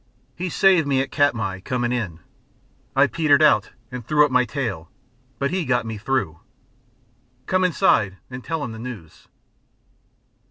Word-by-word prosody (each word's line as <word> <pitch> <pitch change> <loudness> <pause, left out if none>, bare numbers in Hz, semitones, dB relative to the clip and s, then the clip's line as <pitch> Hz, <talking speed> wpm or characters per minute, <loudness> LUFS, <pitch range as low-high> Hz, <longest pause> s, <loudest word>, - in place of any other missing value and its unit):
He 180 +2 -4
saved 180 -3 +3
me 135 -2 +2
at 135 - -2
Katmai, 110 -10 0
coming 120 +4 -2
in. 95 -10 -3 0.7
I 135 +1 +6
petered 155 -1 +3
out 150 - +4 0.2
and 125 -1 -6
threw 150 +5 +4
up 145 - -4
my 125 0 +3
tail, 115 - -4 0.5
but 140 +1 -1
he 185 -1 -1
got 125 -5 0
me 110 -2 -5
through. 105 -10 -2 1.1
Come 185 +4 +1
inside 105 - +2
and 125 -1 -9
tell 160 -3 -3
him 120 - -5
the 110 - -9
news." 110 -10 -10
125 Hz, 155 wpm, -22 LUFS, 110-150 Hz, 1.1 s, I